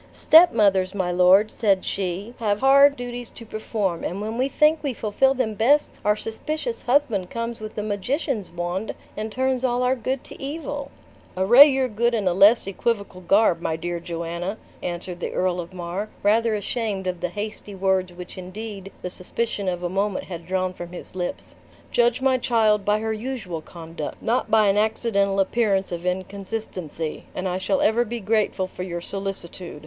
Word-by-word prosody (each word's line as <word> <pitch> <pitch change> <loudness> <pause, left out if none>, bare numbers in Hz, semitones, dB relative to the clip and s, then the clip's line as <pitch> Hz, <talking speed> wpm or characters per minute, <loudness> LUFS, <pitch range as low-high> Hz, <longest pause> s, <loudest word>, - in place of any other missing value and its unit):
"Stepmothers, 205 - +5
my 185 -3 0
lord," 185 +4 +5
said 200 -4 +1
she, 195 +4 -3
"have 210 -2 0
hard 280 +1 +6
duties 245 -1 -6
to 230 - -11
perform; 215 -5 -2
and 185 - -3
when 215 +2 -4
we 255 +3 +1
think 300 +3 +3
we 275 -5 -2
fulfill 245 +6 +2
them 240 -4 -1
best, 265 +8 +3
our 210 0 +3
suspicious 310 - -4
husband 245 -9 +1
comes 230 0 -4
with 215 0 -8
a 210 - -1
magician's 215 - -2
wand, 175 +4 -3 0.2
and 215 +1 -4
turns 260 +1 0
all 250 -1 +1
our 250 +1 +2
good 260 +1 -3
to - - -12
evil." 295 +4 -4 0.5
"Array 240 +10 +9
your 265 -2 +1
good 235 +1 +1
in 205 -4 0
a 180 - +3
less 205 +6 +6
equivocal 200 -1 -2
garb, 185 -1 +3
my 160 - -1
dear 170 +1 -3
Joanna," 170 +3 -4 0.2
answered 175 0 -5
the - - -4
Earl 180 -1 0
of 175 0 -6
Mar, 185 +3 -4
rather 220 +2 +3
ashamed 205 -2 -2
of 180 -1 -2
the 180 +1 -2
hasty 210 +1 -6
words 190 -1 +1
which 180 +1 -9
indeed 195 +1 -7
the 180 - -2
suspicion 200 +1 -2
of 180 -1 -4
a - - +1
moment 195 +2 -1
had 170 -2 -8
drawn 185 0 -1
from 175 -1 -9
his 180 - -9
lips; 180 -1 -5 0.4
"judge 240 +1 +2
my 260 -1 +3
child 220 -4 +2
by 210 +1 +2
her 220 0 -1
usual 215 -8 -5
conduct, 165 -2 -7
not 240 +3 0
by 220 -1 +5
an 200 +1 +3
accidental 210 -2 +1
appearance 195 -1 +1
of 175 +1 -4
inconsistency, 185 -4 -4
and 185 - -2
I 185 0 -1
shall 190 +1 0
ever 225 +3 +3
be 240 +1 -5
grateful 210 -2 0
for 185 - -9
your 175 -2 -4
solicitude. 190 -4 -6
205 Hz, 180 wpm, -24 LUFS, 185-235 Hz, 0.5 s, Array